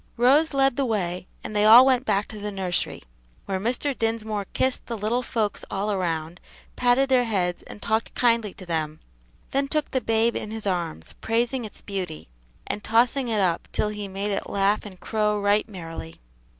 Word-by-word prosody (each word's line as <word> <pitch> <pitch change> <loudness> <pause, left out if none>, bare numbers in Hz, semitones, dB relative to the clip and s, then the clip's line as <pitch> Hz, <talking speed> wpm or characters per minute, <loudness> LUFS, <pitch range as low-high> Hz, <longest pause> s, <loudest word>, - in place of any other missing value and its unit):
Rose 275 +7 +4
led 270 -1 +3
the 280 - +2
way 185 -6 -2 0.2
and 215 - -6
they 210 - +3
all 230 +4 +10
went 260 -1 +3
back 200 -6 +1
to 215 - -8
the 210 0 -4
nursery, 190 -3 -2 0.4
where 190 -1 -2
Mr. 250 +6 -1
Dinsmore 220 -3 -2
kissed 260 0 -1
the 235 - -3
little 220 +4 0
folks 220 -4 -2
all 200 +1 -1
round, 165 -2 -2 0.4
patted 250 +2 +3
their 255 -2 +3
heads 180 -6 -1
and - - -11
talked 220 0 -1
kindly 230 -4 +2
to 185 - -10
them, 155 -2 -2 0.5
then 275 +1 +1
took 305 +1 -1
the 260 - 0
babe 225 +1 +2
in 215 - -4
his 220 -1 -4
arms, 170 - -3
praising 235 +2 0
its 210 - -10
beauty, 185 -6 -5 0.4
and 205 - -4
tossing 245 +3 +2
it 220 -3 +1
up 175 -3 0
till 210 - +1
he 210 -1 -5
made 195 +2 -3
it 195 - -3
laugh 200 +2 +1
and 185 -3 -12
crow 210 -1 0
right 205 +2 +2
merrily. 165 - -8
210 Hz, 190 wpm, -25 LUFS, 195-240 Hz, 0.5 s, all